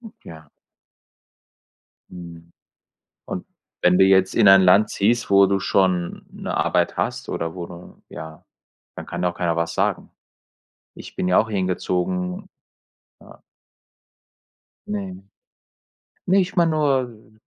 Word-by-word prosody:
Hm. 225 -3 -12
Ja. 80 -2 -13 1.6
Mhm. 85 -2 -12 0.7
Und - - -6 0.4
wenn 90 0 +4
du - - +6
jetzt 95 -1 +3
in 110 -3 +5
ein 95 0 +8
Land 95 +4 +4
ziehst, 115 +3 0
wo 100 0 +6
du 100 0 0
schon 95 -2 0
'ne - - -5
Arbeit - - 0
hast - - -3
oder 85 +1 -4
wo 90 -2 -6
du 90 0 -13
ja, 80 -1 -10 0.5
dann - - -8
kann 85 +1 -5
ja 90 - +2
auch - - -18
keiner 85 -2 -1
was 85 0 -2
sagen. - - -2 0.8
Ich - - -12
bin 90 - -2
ja 90 - +3
auch 110 - 0
hier 105 - -2
hingezogen. 90 0 -2 0.7
Ja. - - -17 1.5
Ne. 95 -2 -6 1.0
Ne, 190 +2 +3
ich 185 -1 -2
meine 170 -3 +3
nur 130 -8 -1
95 Hz, 135 wpm, -22 LUFS, 90-105 Hz, 1.6 s, ein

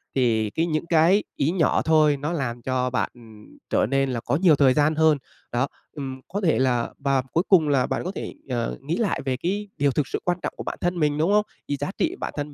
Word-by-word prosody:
thì 115 -4 +2
cái 165 +10 0
những 155 -1 -1
cái 170 +5 +4
ý 150 +4 +1
nhỏ 175 -4 +2
thôi 155 -2 +4
nó 150 +4 -3
làm 120 -7 -3
cho 125 +1 -1
bạn 125 -5 -1 0.6
trở - - +2
nên 135 +2 +1
là 120 - -2
có 120 - -1
nhiều 165 0 +5
thời 135 -2 +4
gian 150 +2 +2
hơn. 160 -2 +4 0.3
Đó, 125 +3 +1 0.2
ừm, 135 -3 -6
có 200 +3 -3
thể 165 -8 +2
là 125 -3 +1
và 135 -2 +1
cuối 170 - +2
cùng 165 -6 +5
là 135 -3 +3
bạn - - -2
có 180 - -3
thể, - - -5 0.2
ờ, 120 -2 -2
nghĩ 150 +5 -2
lại 220 -5 0
về 130 -2 0
cái 200 +7 -2
điều 140 0 +2
thực 140 0 -1
sự - - -3
quan 175 0 +1
trọng - - -2
của - - -5
bản - - -5
thân 175 0 -1
mình, 150 -1 +1
đúng 165 +6 +2
hông? 210 0 +3 0.2
Vì 145 - -1
giá 145 +5 -3
trị 345 +2 0
bản - - -4
thân 145 0 -4
145 Hz, 250 wpm, -24 LUFS, 130-170 Hz, 0.6 s, nhiều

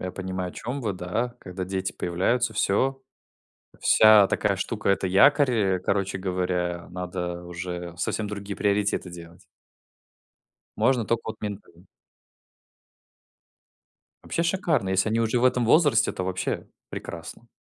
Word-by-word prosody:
Я 90 0 -4
понимаю, 95 -1 -4
о - - -16
чем 130 +4 -5
вы. 110 -5 -1
Да. 105 +7 -3
Когда 95 0 -6
дети 95 0 -3
появляются, 110 +7 0
всё. 135 +7 +1 0.8
Вся 110 -2 +7
такая 100 0 0
штука- 105 +2 -2
это 95 -1 +2
якорь. 140 +9 +5 0.3
Э, - - -8
короче 95 +1 -1
говоря, 90 -2 -2
надо 90 -1 -5
уже 90 0 -6
совсем 105 +4 -2
другие 100 -1 -6
приоритеты 100 -2 0
делать. 85 0 -11 1.4
Можно 125 -4 +3
только 115 +2 0
вот - - -11
ментально. 100 -4 -8 2.4
Вообще 170 - -1
шикарно. 170 - 0
Если 95 +3 +2
они 115 +1 +1
уже 115 +2 +1
в 120 - +1
этом 125 -1 +3
возрасте, 135 -3 +4
то 95 - -4
вообще 90 0 -3 0.2
прекрасно. 85 +7 -8
100 Hz, 135 wpm, -25 LUFS, 90-115 Hz, 2.4 s, Вся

